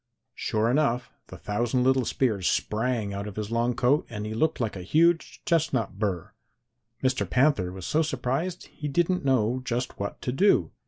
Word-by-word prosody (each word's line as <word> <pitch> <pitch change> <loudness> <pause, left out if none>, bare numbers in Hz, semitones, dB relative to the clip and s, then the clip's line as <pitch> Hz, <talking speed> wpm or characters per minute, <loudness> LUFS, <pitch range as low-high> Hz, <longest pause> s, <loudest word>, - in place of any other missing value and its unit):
Sure 110 -1 0
enough, 125 -3 +1 0.2
the - - -10
thousand 120 +4 0
little 130 -1 +3
spears 110 -9 +1
sprang 110 -2 -1
out 100 +1 -4
of 105 - -8
his 105 0 -4
long 120 +1 +1
coat, 135 +5 +3
and 105 -2 -5
he 110 - -4
looked 155 +8 0
like 115 -4 -1
a 95 - -6
huge 165 - +2
chestnut 160 - 0
burr. 95 -6 -2 0.7
"Mr. 130 0 +1
Panther 125 -9 +2
was 95 -1 -8
so 155 - +2
surprised 150 +5 -2
he 150 - -5
didn't 175 +4 +1
know 130 -2 +2
just 125 0 -3
what 100 0 -4
to 125 - -3
do. 195 +10 +3
125 Hz, 175 wpm, -26 LUFS, 105-140 Hz, 0.7 s, little